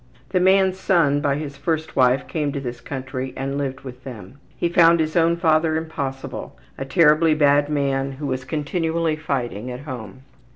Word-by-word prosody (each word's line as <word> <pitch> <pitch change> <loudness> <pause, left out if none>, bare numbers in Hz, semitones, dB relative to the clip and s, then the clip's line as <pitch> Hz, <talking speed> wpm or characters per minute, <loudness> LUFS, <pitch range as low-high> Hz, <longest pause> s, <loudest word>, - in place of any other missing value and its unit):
The 185 - +1
man's 190 0 +3
son 160 -7 +3
by 140 -1 +1
his 145 -1 -6
first 160 +2 -2
wife 130 0 +3
came 150 -4 -2
to 140 - -2
this 120 -2 -6
country 130 -1 -5
and 135 +1 -3
lived 135 -2 -3
with 125 -1 -10
them. 125 -1 -10 0.2
He - - +1
found 170 0 +5
his 155 0 -1
own 170 0 +3
father 160 -1 +2
impossible 140 -4 -5 0.2
a 135 - -5
terribly 155 +1 +4
bad 145 -1 +3
man 135 -2 0
who 145 +2 -7
was 130 -1 -2
continually 160 +2 -1
fighting 125 -7 -3
at 125 +1 -6
home. 130 -4 -8
145 Hz, 175 wpm, -22 LUFS, 130-160 Hz, 0.2 s, found